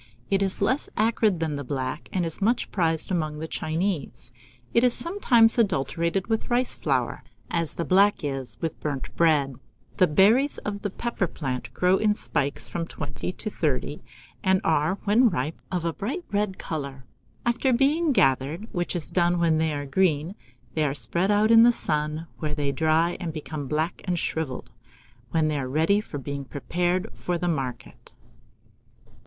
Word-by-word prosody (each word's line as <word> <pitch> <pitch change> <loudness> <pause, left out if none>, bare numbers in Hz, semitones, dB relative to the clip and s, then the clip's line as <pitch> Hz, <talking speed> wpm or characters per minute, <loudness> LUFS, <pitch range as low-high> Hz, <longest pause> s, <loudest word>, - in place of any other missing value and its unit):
It 195 0 +3
is 195 0 0
less 260 +8 0
acrid 215 -4 +2
than 155 -3 -1
the 145 - -4
black, 130 -1 -4
and 180 -2 0
is 165 +4 -5
much 230 +5 +1
prized 165 -2 +1
among 155 -4 -1
the 160 +1 -5
Chinese. 155 -8 -2 0.4
It 235 - +4
is 250 -1 +5
sometimes 245 - +4
adulterated 170 - 0
with 225 -1 -2
rice 245 +1 +1
flour, - - -1 0.3
as 165 -2 -1
the 170 - -2
black 200 +1 +4
is 135 -3 -4
with 165 -2 -3
burnt 140 -4 -4
bread. 145 -6 +2 0.4
The 185 - +5
berries 220 - +4
of 205 0 -3
the 205 - -2
pepper 220 -2 -2
plant 130 -6 -4
grow 180 +1 +3
in 210 0 +2
spikes 140 -8 -1
of - - -15
from 165 -1 -3
twenty 145 +3 -5
to 215 - -5
thirty, 145 -3 -1 0.4
and 190 0 +3
are, 155 +3 +2
when 225 +4 +4
ripe, 150 -2 -3
of 180 -2 -1
a 165 - 0
bright 270 - -4
red 205 -2 0
colour. 140 -4 -5 0.4
After 240 +2 +2
being 290 +6 +3
gathered, 145 - +2
which 175 0 -2
is 170 - -3
done 175 -1 +2
when 165 -2 +2
they 160 0 +1
are 145 -1 -3
green, 155 +2 +1 0.4
they 155 - +1
are 140 -2 0
spread 160 - 0
out 210 +2 +4
in 225 0 +9
the 240 +1 +7
sun, 150 -5 -2
where 150 -2 -2
they 145 -2 0
dry 160 +4 +2
and 175 -4 -3
become 155 -2 -6
black 155 +5 -1
and 180 -2 0
shrivelled, 135 -7 -3 0.6
when 155 +4 +1
they 150 -2 0
are 130 -2 -3
ready 160 +9 +2
for 155 - -7
being 140 +1 -5
prepared 175 +6 -1
for 175 -1 -2
the 175 - -2
market. 130 -8 -4
170 Hz, 175 wpm, -25 LUFS, 150-200 Hz, 0.6 s, in